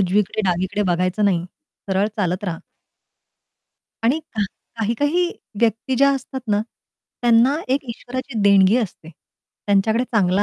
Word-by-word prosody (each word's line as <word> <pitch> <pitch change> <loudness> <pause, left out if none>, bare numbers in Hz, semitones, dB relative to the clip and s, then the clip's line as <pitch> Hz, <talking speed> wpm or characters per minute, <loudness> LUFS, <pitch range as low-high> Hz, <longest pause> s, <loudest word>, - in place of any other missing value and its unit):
उजवीकडे, 195 +3 +1
डावीकडे 190 +3 0
बघायचं 185 +4 0
नाही. 180 -4 +2 0.5
सरळ 190 +2 +2
चालत 185 -1 -1
राहा. 170 -4 -3 1.4
आणि 245 +7 +2
का 225 -9 -4 0.4
काही-काही 290 +11 +1 0.3
व्यक्ती 230 +3 +1
ज्या 280 +2 +5
असतात 265 0 -5
ना, 205 0 +2 0.6
त्यांना 240 +4 +4 0.2
एक 275 +1 0
ईश्वराची 245 +1 -5
देणगी 200 +2 +5
असते, 200 -8 -3 0.6
त्यांच्याकडे 220 +4 +2
चांगला 200 -5 +2
210 Hz, 120 wpm, -21 LUFS, 190-245 Hz, 1.4 s, ज्या